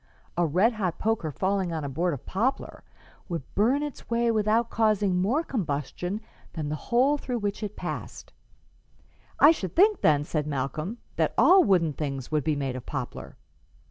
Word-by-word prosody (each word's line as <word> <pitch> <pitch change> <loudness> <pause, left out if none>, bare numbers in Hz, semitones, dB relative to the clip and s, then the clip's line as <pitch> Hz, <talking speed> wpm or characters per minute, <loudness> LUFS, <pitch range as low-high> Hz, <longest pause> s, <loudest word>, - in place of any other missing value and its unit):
A 175 -1 +2
red 190 +10 +3
hot 190 -6 -2
poker 215 -8 -1
falling 190 +2 -1
on 160 -2 -3
a - - -3
board 165 +4 -1
of 130 - -12
poplar 250 +8 -2 0.5
would 170 -5 -3
burn 250 +8 +2
its 295 -3 -7
way 235 0 +2
without 220 +2 +1
causing 210 -5 +2
more 255 - +1
combustion 180 - -3 0.3
than 155 -3 -4
the 155 - -2
hole 265 +5 +3
through 250 -3 -3
which 205 -2 -3
it 210 -1 -5
passed.'" - - -6 1.1
"I 295 - +9
should 190 - -4
think, 415 +3 +4
then," 145 -2 +4
said 150 0 -2
Malcolm, 150 - -3 0.2
"that - - +1
all 375 0 +7
wooden 175 - +2
things 135 -3 -4
would 150 -2 +1
be 155 +1 +1
made 135 -3 -2
of 130 - -8
poplar." 130 -4 -6
190 Hz, 175 wpm, -27 LUFS, 150-230 Hz, 1.1 s, I